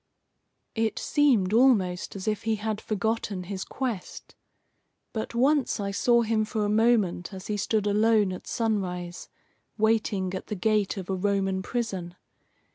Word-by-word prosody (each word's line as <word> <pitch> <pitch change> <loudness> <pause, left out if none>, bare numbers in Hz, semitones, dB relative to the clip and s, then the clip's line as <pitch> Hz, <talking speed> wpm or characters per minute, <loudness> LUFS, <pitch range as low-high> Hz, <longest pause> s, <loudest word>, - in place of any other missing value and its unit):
It 225 -1 -1
seemed 240 -10 +2
almost 210 -9 +3
as 195 0 -6
if 215 -1 0
he 225 -1 0
had 215 0 -3
forgotten 215 -2 -2
his 190 +1 -5
quest. 245 -8 -5 0.8
But 220 +1 -4
once 270 +1 +2
I 200 -1 -2
saw 235 +4 +3
him 220 -1 +1
for 215 0 -2
a - - 0
moment 215 -5 +2
as 190 -1 -8
he 210 - -2
stood 210 +1 0
alone 210 -1 +3
at 185 - -9
sunrise, 180 -6 -2 0.5
waiting 215 -4 +1
at 190 - -5
the 210 - -3
gate 210 +1 +1
of 185 -2 -5
a - - 0
Roman 195 0 0
prison. 190 -6 -3
210 Hz, 150 wpm, -27 LUFS, 190-225 Hz, 0.8 s, almost